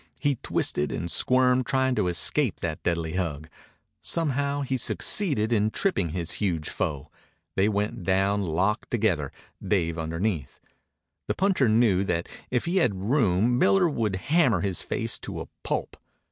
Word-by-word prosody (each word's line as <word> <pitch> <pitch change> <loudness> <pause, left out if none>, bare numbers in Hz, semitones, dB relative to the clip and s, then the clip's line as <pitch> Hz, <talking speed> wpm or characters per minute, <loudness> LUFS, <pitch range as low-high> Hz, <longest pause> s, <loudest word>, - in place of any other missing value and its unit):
He 145 -3 0
twisted 75 - 0
and 85 +1 -3
squirmed, 125 - +3
trying 130 -1 +1
to 105 -6 0
escape 95 - +1
that 80 -2 -3
deadly 85 0 -2
hug. 80 -4 -3 0.5
Somehow 145 -3 -1
he 135 -1 -2
succeeded 130 - +2
in 105 -1 +2
tripping 110 - 0
his 85 +1 -2
huge 85 -7 -1
foe. 70 -4 -3 0.4
They 100 +2 +3
went 105 -1 -2
down 95 +2 +1
locked 95 +5 -1
together, 95 - 0 0.3
Dave 85 -4 0
underneath. 80 -2 -3 0.7
The - - -1
puncher 185 - +2
knew 110 -4 +3
that 85 -2 -1 0.2
if 125 -1 0
he 175 +3 0
had 105 - 0
room 120 -2 +2
Miller 95 - +4
would 110 - -1
hammer 130 - +2
his 95 -2 0
face - - -1
to - - -6
a - - -7
pulp. - - -3
100 Hz, 150 wpm, -26 LUFS, 85-130 Hz, 0.7 s, Miller